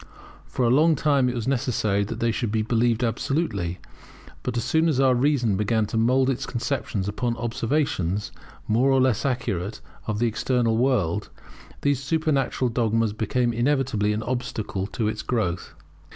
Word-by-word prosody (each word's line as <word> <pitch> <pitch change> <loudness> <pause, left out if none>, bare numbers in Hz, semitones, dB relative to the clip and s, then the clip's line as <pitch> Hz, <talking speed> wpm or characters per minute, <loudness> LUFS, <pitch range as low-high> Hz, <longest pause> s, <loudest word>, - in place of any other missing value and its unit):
For 120 +11 -1
a 115 - +3
long 155 +5 +5
time 140 -3 +2
it 125 - -3
was 120 0 -3
necessary 120 -6 +1
that 115 +3 -6
they 115 0 +1
should 115 -1 -2
be 110 0 +1
believed 115 +1 +1
absolutely; 115 - -1 0.6
but 120 - -3
as 120 - 0
soon 160 +5 +2
as 140 -4 +1
our 135 -1 +5
reason 125 -4 +2
began 110 +1 +1
to 105 - -6
mould 125 +4 +3
its 135 -2 -1
conceptions 120 -5 -2
upon 115 +3 -2
observations, 115 - -1 0.4
more 120 +5 +3
or 135 -1 +4
less 130 -1 +2
accurate, 105 -5 -2 0.3
of 105 -2 -1
the 120 - +1
external 115 0 +1
world, 105 -7 +1 0.5
these 145 -2 +1
supernatural 140 -4 0
dogmas 115 -2 +1
became 120 +3 0
inevitably 120 -4 +1
an 105 +1 -2
obstacle 110 -5 -3
to 110 0 -2
its 110 0 -2
growth. 95 -8 -2
120 Hz, 165 wpm, -24 LUFS, 110-130 Hz, 0.6 s, long